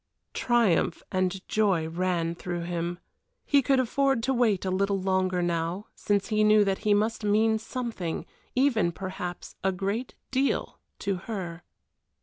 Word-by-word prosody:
Triumph 225 -9 +2
and 185 0 -1
joy 195 -7 +2
ran 170 0 0
through 175 0 -4
him. 175 0 -3 0.5
He 285 -1 +4
could 270 0 +3
afford 265 0 +1
to 265 - +1
wait 225 -6 +2
a 185 - 0
little 195 +1 +1
longer 185 -1 +1
now, 170 +3 -2
since 205 +1 0
he 215 -1 +3
knew 215 0 +6
that 195 -1 0
he 210 -1 +3
must 220 +2 0
mean 220 +1 +3
something, 225 -7 -4 0.3
even 250 -9 +3
perhaps 180 -1 -6
a 190 - +3
great 200 +7 -3 0.2
deal, 270 +1 0 0.2
to 195 -2 -1
her. 180 -6 -4
195 Hz, 145 wpm, -27 LUFS, 180-225 Hz, 0.5 s, knew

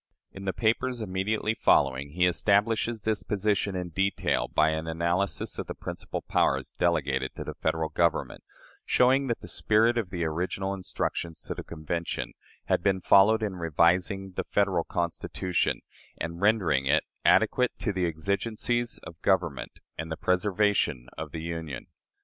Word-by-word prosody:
" - - -59
In 95 0 -8
the 95 - +1
papers 120 +4 0
immediately 105 +2 -1
following, 70 -8 +2
he 90 +1 +3
establishes 105 +4 +2
this 110 -3 0
position 100 -1 0
in 90 -1 -3
detail 95 +4 0
by 80 - +3
an 80 +1 -3
analysis 85 +4 -1
of - - -4
the - - -5
principal - - -6
powers - - +1
delegated 70 -6 +1
to - - -5
the - - -6
Federal 80 -1 -1
Government, 85 +2 0 0.4
showing 135 +2 +3
that 120 - -2
the - - -9
spirit 115 +3 +2
of 105 -6 -3
the 90 -2 -3
original 90 +4 -2
instructions 85 -3 -3
to - - -5
the - - -7
Convention 85 +1 -4 0.3
had - - +1
been 95 0 +2
followed 105 +4 +5
in 100 -3 -2
revising 90 +4 +1
"the 90 - -3
Federal 95 -5 +1
Constitution" 85 0 -1 0.4
and 85 +2 -4
rendering 90 -11 +3
it 75 +3 +3 0.2
"adequate 125 -1 +3
to 105 - -2
the 90 -2 0
exigencies 110 +8 -1
of 80 0 -11
government - - 0 0.2
and 80 0 -4
the 80 - -3
preservation 90 - +1
of - - -5
the 80 - -6
Union." 80 -4 -5
95 Hz, 155 wpm, -28 LUFS, 85-105 Hz, 0.4 s, followed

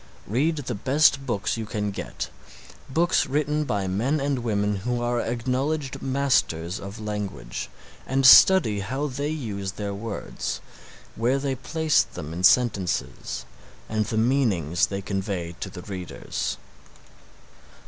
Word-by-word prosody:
Read 145 - +1
the 135 -5 -4
best 135 +4 +3
books 105 -2 -1
you 110 - -3
can 105 -1 -2
get, 100 - -5 0.6
books 170 +6 +2
written 150 +1 0
by 100 -7 -1
men 115 +11 0
and 140 -1 0
women 105 -3 0
who 120 +5 -2
are 120 0 0
acknowledged 130 +5 -2
masters 130 -11 +1
of 100 +3 -8
language, 105 - -4 0.4
and 135 +1 +1
study 130 - +8
how 130 +9 -2
they 145 +1 -2
use 105 -10 -4
their 100 -1 -4
words, 105 +1 -4 0.6
where 120 +4 +2
they 135 -1 -1
place 155 +4 +2
them 80 -2 -7
in 85 - -5
the - - -4
sentences, 100 - +2 0.4
and 110 -1 -1
the 110 - -2
meanings 110 - +2
they 100 0 -4
convey 95 -4 -3
to 95 - -4
the 90 -1 -9
readers. 95 -3 -4
115 Hz, 140 wpm, -25 LUFS, 100-135 Hz, 0.6 s, study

